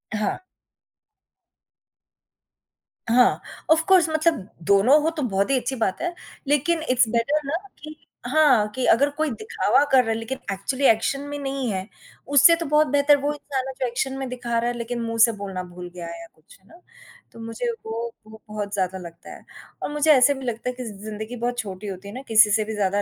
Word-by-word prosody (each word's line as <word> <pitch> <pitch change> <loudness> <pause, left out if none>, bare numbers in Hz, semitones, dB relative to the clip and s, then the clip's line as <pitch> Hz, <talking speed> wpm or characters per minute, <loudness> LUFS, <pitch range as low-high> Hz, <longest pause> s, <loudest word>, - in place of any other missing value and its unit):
हाँ। 210 - -2 2.7
हाँ, 245 +1 +4 0.3
of 320 +1 +4
course 365 -4 +5
मतलब 315 - 0 0.2
दोनों 225 +10 +5
हो 320 - +2
तो - - -1
बहुत 200 -2 0
ही 270 - +3
अच्छी 265 +2 -3
बात 220 -6 -1
है, 350 +1 -2 0.3
लेकिन 295 +3 +1
इट्स 250 -2 +4
बेटर 235 +6 +1
ना 290 +4 -2 0.3
कि 305 0 -8 0.3
हाँ, 265 -6 +4
कि 260 - -1
अगर 285 +5 +4
कोई 310 -1 0
दिखावा 220 +4 +1
कर 260 -1 +6
रहा 225 - -4
है - - 0
लेकिन 255 +4 -5
एक्चुअली 255 +8 -2
एक्शन 225 +5 +1
में 290 - -4
नहीं 270 -3 -3
है, 190 +1 -4 0.4
उससे 285 +4 +6
तो 335 - -5
बहुत 300 +1 +3
बेहतर 285 0 +4
वो 290 +1 0
इंसान 270 -2 -4
जो 255 - 0
एक्शन 260 +3 -2
में 270 - -4
दिखा 240 -2 -3
रहा 240 +1 0
है 245 - -4
लेकिन 235 0 -4
मुँह 230 0 -3
से 230 - -1
बोलना 195 -2 -5
भूल 180 0 -10
गया 175 -1 -7
है 170 0 -8
या 170 - -11
कुछ, 155 +1 -20
है 190 - -29
ना? 340 - -17 0.5
तो - - -14
मुझे 230 - -4 0.2
वो 230 +1 -4 0.2
वो 220 0 -14
बहुत 210 -1 -5
ज़्यादा 190 -1 -1
लगता 170 -2 -11
है - - -14 0.4
और - - -2
मुझे 295 +1 +3
ऐसे 280 0 +6
भी 265 -1 -8
लगता 240 +1 -3
है - - -3
कि 250 - -6
ज़िंदगी 215 +2 -7
बहुत 245 +1 -3
छोटी 200 -2 -6
होती 195 +1 -7
है 200 - -8
ना, 255 - -6
किसी 220 -1 +6
से 215 +1 +2
भी 220 - -5
ज़्यादा 200 0 0
240 Hz, 210 wpm, -23 LUFS, 210-280 Hz, 2.7 s, कर